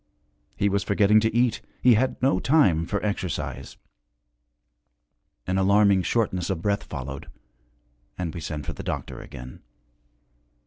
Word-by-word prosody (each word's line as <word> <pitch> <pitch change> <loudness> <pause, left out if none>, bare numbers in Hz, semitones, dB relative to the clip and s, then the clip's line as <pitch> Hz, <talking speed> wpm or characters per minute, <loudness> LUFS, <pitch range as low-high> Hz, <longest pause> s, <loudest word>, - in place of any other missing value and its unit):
He 100 - +2
was 100 0 0
forgetting 100 +1 +4
to 110 +1 +1
eat, 120 -1 +2 0.2
he 125 - +5
had 125 +4 +1
no 130 -8 +3
time 95 - +3
for 105 +1 -2
exercise. 90 -10 -4 1.7
An 95 +1 0
alarming 100 0 +4
shortness 95 -1 -1
of 90 -4 -3
breath 100 0 +1
followed, 70 -1 -7 0.9
and 85 -3 -3
we 85 - -6
sent 75 -3 -5
for 85 - -4
the - - -8
doctor 85 -7 -5
again. 65 +1 -10
95 Hz, 135 wpm, -25 LUFS, 80-105 Hz, 1.7 s, he